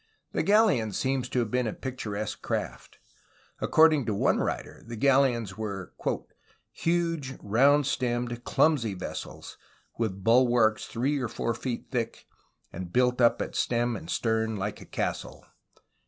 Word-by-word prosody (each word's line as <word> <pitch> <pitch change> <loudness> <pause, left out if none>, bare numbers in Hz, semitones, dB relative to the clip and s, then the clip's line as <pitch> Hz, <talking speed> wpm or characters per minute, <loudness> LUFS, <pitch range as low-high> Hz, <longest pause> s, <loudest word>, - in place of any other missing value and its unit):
The - - 0
galleon 200 - +3
seems 130 +2 -1
to - - -3
have 115 -4 0
been 125 -1 +1
a 110 - -2
pictur 125 -6 -5
esque 110 - -4
craft. - - -4 0.6
According 155 -5 +4
to 105 - 0
one - - +2
writer - - -3
the 115 0 -7
galleons 120 -5 +2
were: 100 -4 -5 0.8
"huge 165 -5 -1
round 135 +8 +4
stemmed, 120 -2 -1
clumsy 120 -11 +2
vessels, 90 - -7 0.4
with 100 -4 -2
bulwarks 115 -2 +4
three 140 +5 -1
or 125 - -1
four 115 +1 -2
feet 120 0 -5
thick, 120 -4 -3 0.5
and 90 0 -6
built 125 +2 +2
up 120 - +4
at - - -8
stem 120 0 +1
and 90 -5 -8
stern 110 0 0
like 105 +1 -4
a - - -10
castle." - - -4
120 Hz, 145 wpm, -28 LUFS, 110-130 Hz, 0.8 s, According